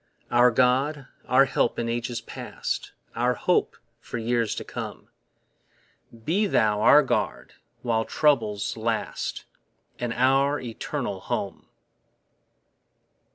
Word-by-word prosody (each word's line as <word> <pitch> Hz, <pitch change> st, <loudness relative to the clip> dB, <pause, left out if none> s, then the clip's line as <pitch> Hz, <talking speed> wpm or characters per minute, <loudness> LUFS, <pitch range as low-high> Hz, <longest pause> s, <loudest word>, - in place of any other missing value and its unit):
Our 120 Hz, +1 st, +6 dB
God, 130 Hz, +4 st, +2 dB, 0.2 s
our -, -, +5 dB
help -, -, 0 dB
in 115 Hz, -, -1 dB
ages 120 Hz, 0 st, -2 dB
past, -, -, -5 dB, 0.2 s
Our 125 Hz, +1 st, +1 dB
hope 180 Hz, -, +1 dB, 0.2 s
for 120 Hz, -, -6 dB
years 115 Hz, -1 st, 0 dB
to -, -, -5 dB
come, -, -, -7 dB, 1.2 s
Be 200 Hz, +6 st, +2 dB
thou 105 Hz, -, +2 dB
our 150 Hz, +7 st, +7 dB
guard 135 Hz, -, -2 dB, 0.3 s
while 115 Hz, -2 st, +1 dB
troubles 115 Hz, -9 st, +1 dB
last 110 Hz, 0 st, -3 dB, 0.5 s
And 120 Hz, -1 st, -2 dB
our 135 Hz, +4 st, +2 dB
eternal 115 Hz, -3 st, -4 dB
home. -, -, -4 dB
120 Hz, 110 wpm, -25 LUFS, 115-135 Hz, 1.2 s, our